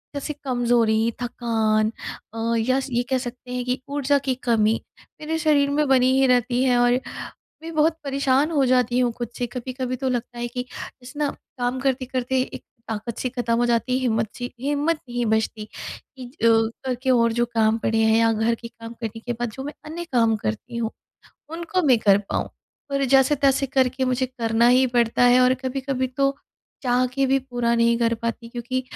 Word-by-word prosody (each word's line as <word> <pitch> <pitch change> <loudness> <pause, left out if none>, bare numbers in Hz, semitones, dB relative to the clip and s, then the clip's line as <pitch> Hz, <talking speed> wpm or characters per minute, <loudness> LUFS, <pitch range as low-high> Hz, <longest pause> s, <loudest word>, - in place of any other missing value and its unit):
जैसे 285 +2 -3
कमजोरी, 235 -3 +2
थकान 220 -3 0 0.4
अ, - - -8 0.2
या 255 +4 +2
स 270 - -4
ये 240 0 +1
कह 260 - +2
सकते 250 0 -7
हैं 250 0 -2
कि 250 +1 -1
ऊर्जा 285 0 +2
की 260 - +2
कमी, 220 -1 +3 0.4
मेरे 320 +1 -2
शरीर 295 -3 +3
में 300 - +2
बनी 260 -1 +4
ही 270 - +4
रहती 245 0 +2
है 250 -2 +3
और 245 +1 +4 0.6
मैं 330 0 -6
बहुत 310 +1 +3
परेशान 275 +1 +1
हो 285 -4 +3
जाती 250 -1 +2
हूँ 245 -1 +2
खुद 240 -2 -4
से 245 - -1
कभी-कभी 255 +1 -4
तो 265 - -2
लगता 245 -1 -3
है 240 - -2
कि, 250 +1 -4 0.4
जैसे 260 +4 -10
ना 295 -1 +1 0.3
काम 245 +1 -1
करते-करते 260 -1 0
एक 255 - -6 0.2
ताकत 220 +1 -4
सी 255 - -2
ख़त्म 240 -2 -1
हो 240 - +2
जाती 240 +1 +1
है, - - -1
हिम्मत 225 -3 +1
सी 245 0 -5
हिम्मत 290 +5 0
नहीं 240 0 -1
बचती 220 0 0
कि 255 +4 -10 0.2
जो 230 0 +6 0.3
घर 255 -1 0
के 265 - 0
और 235 -2 +4
जो 240 +1 +1
काम 220 0 +3
पड़े 225 0 0
हैं 220 0 +4
या 230 0 +4
घर 225 +2 +1
के 235 - -9
काम 230 0 -10
करने 225 0 -4
के 240 +1 -3
बाद 240 0 -3
जो 265 +5 -7
मैं 290 +2 -5
अन्य 325 +3 -5
काम 230 -2 +4
करती 215 - -4
हूँ, 230 -1 -1 0.6
उनको 340 +3 -2
मैं 255 -4 +5
कर 200 -2 +4
पाऊँ। - - -1 0.4
पर 275 0 +1
जैसे-तैसे 270 +1 +3
करके 260 0 +1
मुझे 255 0 0
करना 235 -2 +1
ही 255 +1 +5
पड़ता 235 +1 +3
है 245 +1 +6
और 255 0 +5
कभी-कभी 260 0 -1
तो, 275 +2 0 0.5
चाह 250 -1 +2
के 275 0 +2
भी 270 +1 +3
पूरा 245 -3 -1
नहीं 235 0 +3
कर 230 -1 +2
पाती 230 0 -3
क्योंकि 240 +2 -3
250 Hz, 200 wpm, -23 LUFS, 235-265 Hz, 0.6 s, जो